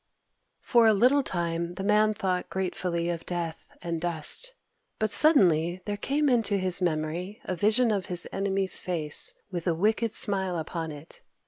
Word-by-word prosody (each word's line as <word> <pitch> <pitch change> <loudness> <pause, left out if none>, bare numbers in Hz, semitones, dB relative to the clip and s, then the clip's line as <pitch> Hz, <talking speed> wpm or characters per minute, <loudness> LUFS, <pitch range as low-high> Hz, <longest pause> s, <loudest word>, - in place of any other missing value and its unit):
For 235 -2 +3
a 220 - +5
little 255 +7 +3
time 170 -5 -4
the 190 - -6
Man 215 +1 +2
thought 185 -3 -3
gratefully 180 -2 -3
of 165 -1 -6
death 170 -2 -5 0.2
and 170 -1 -4
dust. 175 - -1 0.4
But 215 -1 -2
suddenly 180 - +3
there 205 - -3
came 285 +8 -1
into 225 -6 +1
his 185 -1 +1
memory 170 +4 -3
a 185 - -3
vision 220 +6 +2
of 195 -3 -2
his 180 -3 0
enemy's 195 -1 +2
face, 160 -5 +2 0.2
with 175 -1 -5
a 170 - +1
wicked 220 +5 0
smile 190 -4 +2
upon 165 0 -5
it. 150 +2 -13
185 Hz, 160 wpm, -26 LUFS, 170-215 Hz, 0.4 s, a